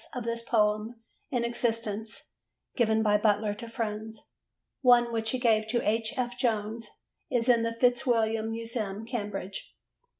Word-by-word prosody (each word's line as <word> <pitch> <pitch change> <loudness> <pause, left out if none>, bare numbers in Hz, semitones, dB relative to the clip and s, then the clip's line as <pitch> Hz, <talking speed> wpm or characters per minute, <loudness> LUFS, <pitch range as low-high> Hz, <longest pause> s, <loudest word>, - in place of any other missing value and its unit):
of 250 - -3
this 230 0 -2
poem 215 0 +1 0.3
in 245 -4 0
existence 230 -2 -2 0.4
given 220 -2 +2
by 210 -1 +4
Butler 210 0 +2
to 230 +2 -8
friends: 220 -1 -5 0.5
one, 240 -2 +5
which 225 -1 0
he 255 - 0
gave 220 -3 +2
to 240 +2 0
H. 220 +1 +1
F. 245 -1 -1
Jones, 220 -2 -1 0.4
is 240 -1 0
in 240 -2 +5
the 230 0 -1
Fitzwilliam 230 -3 +2
Museum, 225 -2 -3
Cambridge. 205 -5 -5
225 Hz, 140 wpm, -29 LUFS, 215-235 Hz, 0.5 s, one